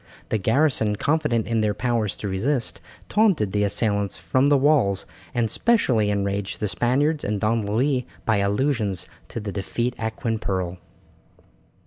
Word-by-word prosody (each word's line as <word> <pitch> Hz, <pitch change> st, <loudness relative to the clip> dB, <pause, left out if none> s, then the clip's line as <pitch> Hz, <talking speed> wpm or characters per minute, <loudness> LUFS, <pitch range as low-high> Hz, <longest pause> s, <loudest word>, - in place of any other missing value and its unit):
The 110 Hz, -, 0 dB
garrison 115 Hz, -1 st, +2 dB
confident 145 Hz, -3 st, +1 dB
in 115 Hz, -1 st, 0 dB
their 105 Hz, -1 st, +1 dB
powers 115 Hz, -5 st, 0 dB
to 105 Hz, -, -5 dB
resist, 115 Hz, +7 st, -1 dB, 0.3 s
taunted 195 Hz, -, +2 dB
the 105 Hz, +1 st, +1 dB
assailants 100 Hz, -1 st, 0 dB
from 110 Hz, +11 st, +1 dB
the 145 Hz, 0 st, +5 dB
walls, 135 Hz, -9 st, +3 dB, 0.3 s
and 120 Hz, -2 st, +1 dB
specially 120 Hz, -, +2 dB
enraged 100 Hz, -1 st, -2 dB
the 105 Hz, -, -1 dB
Spaniards 140 Hz, +8 st, +1 dB
and 105 Hz, 0 st, -1 dB
Don 110 Hz, 0 st, 0 dB
Louis 125 Hz, +4 st, +1 dB, 0.2 s
by 110 Hz, -2 st, +2 dB
allusions 100 Hz, -1 st, 0 dB, 0.2 s
to -, -, -5 dB
the 105 Hz, -2 st, -5 dB
defeat 120 Hz, +5 st, -2 dB
at 110 Hz, 0 st, -3 dB
Quimperle. 95 Hz, -8 st, -2 dB
110 Hz, 145 wpm, -24 LUFS, 100-130 Hz, 0.3 s, the